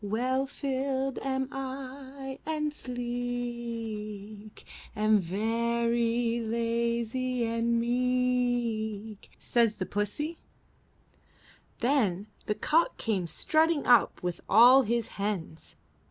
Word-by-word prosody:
'Well 255 Hz, +6 st, 0 dB
filled 270 Hz, -1 st, -2 dB
am 265 Hz, -1 st, -1 dB
I 270 Hz, 0 st, -6 dB
and 300 Hz, -1 st, -2 dB
sleek, 235 Hz, -4 st, -5 dB, 0.3 s
Am 215 Hz, 0 st, +4 dB
very 230 Hz, +4 st, 0 dB
lazy 235 Hz, +2 st, -1 dB
and 230 Hz, +1 st, +1 dB
meek,' 240 Hz, -3 st, 0 dB
Says 230 Hz, -3 st, +2 dB
the 185 Hz, -, -3 dB
pussie.'* 210 Hz, -, -3 dB, 1.4 s
Then 225 Hz, -7 st, +2 dB, 0.2 s
the 210 Hz, -, 0 dB
cock 325 Hz, +8 st, +2 dB
came 195 Hz, -6 st, -1 dB
strutting 315 Hz, -, +2 dB
up 245 Hz, -6 st, +4 dB
with 175 Hz, -1 st, -3 dB
all 245 Hz, +5 st, +8 dB
his 235 Hz, -1 st, 0 dB
hens. 185 Hz, -6 st, -4 dB
235 Hz, 90 wpm, -29 LUFS, 220-260 Hz, 1.4 s, all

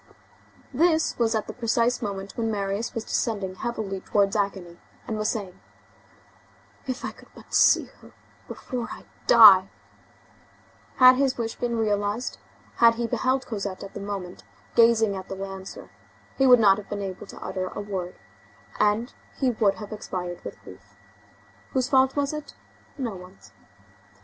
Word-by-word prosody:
This 320 Hz, +3 st, +2 dB
was 225 Hz, -1 st, +2 dB
at 215 Hz, -, -1 dB
the -, -, -7 dB
precise 235 Hz, +1 st, 0 dB
moment 200 Hz, -2 st, -5 dB
when 225 Hz, -1 st, -1 dB
Marius 200 Hz, +1 st, -2 dB
was 230 Hz, -, -3 dB
descending 205 Hz, -5 st, -2 dB
heavily 200 Hz, -1 st, -4 dB
towards 200 Hz, 0 st, +1 dB
agony, 195 Hz, -4 st, -3 dB, 0.3 s
and 220 Hz, -, -3 dB
was 215 Hz, 0 st, -1 dB
saying: 200 Hz, -5 st, -5 dB, 1.3 s
"If 255 Hz, -1 st, -4 dB
I -, -, -3 dB
could -, -, -18 dB
but -, -, -15 dB
see -, -, +5 dB, 0.2 s
her -, -, -16 dB, 0.4 s
before 245 Hz, -2 st, -5 dB
I -, -, -10 dB, 0.2 s
die!"—Had 225 Hz, -, +3 dB
his 270 Hz, -1 st, +1 dB
wish 225 Hz, -2 st, -3 dB
been 240 Hz, -1 st, -2 dB
realized, 210 Hz, +2 st, -1 dB, 0.4 s
had 230 Hz, -1 st, +6 dB
he 235 Hz, 0 st, -2 dB
beheld 260 Hz, +3 st, 0 dB
Cosette 200 Hz, -4 st, -5 dB
at 195 Hz, -, -10 dB
that -, -, -6 dB
moment 195 Hz, -3 st, -6 dB, 0.3 s
gazing 230 Hz, -3 st, +4 dB
at 190 Hz, -1 st, -8 dB
the 195 Hz, -, -4 dB
lancer, 195 Hz, 0 st, -8 dB, 0.4 s
he 270 Hz, -, +3 dB
would 250 Hz, -1 st, +8 dB
not 200 Hz, -2 st, +5 dB
have 205 Hz, -, -12 dB
been 205 Hz, -1 st, -4 dB
able 190 Hz, -1 st, -6 dB
to -, -, -11 dB
utter 185 Hz, 0 st, -4 dB
a -, -, -7 dB
word, 190 Hz, -3 st, -5 dB, 0.6 s
and 210 Hz, +4 st, +1 dB, 0.2 s
he 260 Hz, -2 st, +1 dB
would 215 Hz, -4 st, +1 dB
have 210 Hz, -1 st, -9 dB
expired 180 Hz, -4 st, -6 dB
with 100 Hz, -, -8 dB
grief. 95 Hz, +2 st, -15 dB, 0.8 s
Whose 260 Hz, -1 st, 0 dB
fault 265 Hz, -1 st, +3 dB
was 285 Hz, 0 st, 0 dB
it? 300 Hz, -1 st, -7 dB, 0.4 s
No 240 Hz, -7 st, -3 dB
one's. 180 Hz, +1 st, -14 dB
215 Hz, 155 wpm, -25 LUFS, 195-240 Hz, 1.3 s, would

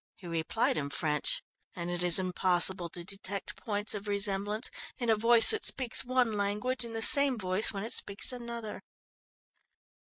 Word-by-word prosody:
He 185 Hz, -, -18 dB
replied 165 Hz, -1 st, -3 dB
in 140 Hz, -2 st, -5 dB
French, 150 Hz, +1 st, -3 dB, 0.3 s
and 175 Hz, 0 st, -6 dB
it 175 Hz, 0 st, -4 dB
is 175 Hz, -1 st, +4 dB
impossible 185 Hz, -1 st, +2 dB
to 175 Hz, +1 st, -11 dB
detect 195 Hz, +1 st, -7 dB
points 210 Hz, -2 st, -1 dB
of 205 Hz, 0 st, -8 dB
resemblance 205 Hz, +2 st, -1 dB, 0.3 s
in 240 Hz, -2 st, -2 dB
a -, -, +2 dB
voice 230 Hz, +1 st, +5 dB
that 440 Hz, -, -3 dB
speaks 255 Hz, -3 st, -1 dB
one 250 Hz, -2 st, -1 dB
language 210 Hz, +5 st, -3 dB
and 230 Hz, -1 st, -10 dB
the 225 Hz, -, +1 dB
same 280 Hz, -1 st, +6 dB
voice 185 Hz, +1 st, +5 dB
when 195 Hz, -1 st, -7 dB
it 225 Hz, -, -4 dB
speaks 200 Hz, +4 st, 0 dB
another. 235 Hz, -3 st, -9 dB
205 Hz, 165 wpm, -28 LUFS, 185-230 Hz, 0.3 s, same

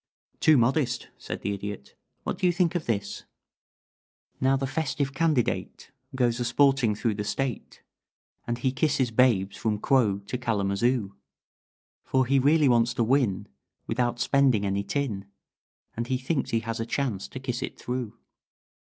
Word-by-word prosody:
"Too 155 Hz, -2 st, +5 dB
modest," 125 Hz, 0 st, +1 dB
said -, -, -6 dB
the 100 Hz, -, -1 dB
Idiot. 100 Hz, -6 st, -7 dB, 0.3 s
"What -, -, -3 dB
do 180 Hz, -, +3 dB
you -, -, +4 dB
think 175 Hz, -1 st, +1 dB
of 175 Hz, -3 st, -3 dB
this: 105 Hz, -4 st, -2 dB, 1.2 s
"Now 135 Hz, +1 st, +3 dB
the 135 Hz, -, -2 dB
festive 140 Hz, -1 st, -2 dB
candidate 150 Hz, -4 st, -1 dB, 0.2 s
Goes 120 Hz, -2 st, +1 dB
a -, -, 0 dB
sporting 130 Hz, -3 st, +3 dB
through 110 Hz, +1 st, 0 dB
the 105 Hz, 0 st, -3 dB
State, 130 Hz, +3 st, -4 dB, 0.6 s
And 120 Hz, 0 st, -1 dB
he 130 Hz, +2 st, 0 dB
kisses 130 Hz, -3 st, +1 dB
babes 110 Hz, -5 st, +2 dB
from 110 Hz, -2 st, -1 dB
Quogue 105 Hz, -5 st, +2 dB
to 125 Hz, -, -4 dB
Kalamazoo; 105 Hz, -1 st, 0 dB, 0.9 s
For 130 Hz, -1 st, +1 dB
he 135 Hz, +2 st, +3 dB
really 145 Hz, +2 st, +4 dB
wants 120 Hz, -1 st, +3 dB
to 115 Hz, -, +2 dB
win 110 Hz, -6 st, +1 dB, 0.4 s
Without 120 Hz, -1 st, -1 dB
spending 130 Hz, -8 st, +3 dB
any 100 Hz, 0 st, 0 dB
tin, 105 Hz, -3 st, -2 dB, 0.7 s
And 115 Hz, +1 st, -3 dB
he 130 Hz, -, 0 dB
thinks 135 Hz, +2 st, -2 dB
he 115 Hz, -, +1 dB
has 115 Hz, 0 st, -4 dB
a 115 Hz, -, -1 dB
chance 115 Hz, -8 st, -2 dB
to 130 Hz, -, -8 dB
kiss 125 Hz, -2 st, -3 dB
it -, -, -5 dB
through." 120 Hz, -3 st, -4 dB
120 Hz, 160 wpm, -27 LUFS, 110-135 Hz, 1.2 s, Too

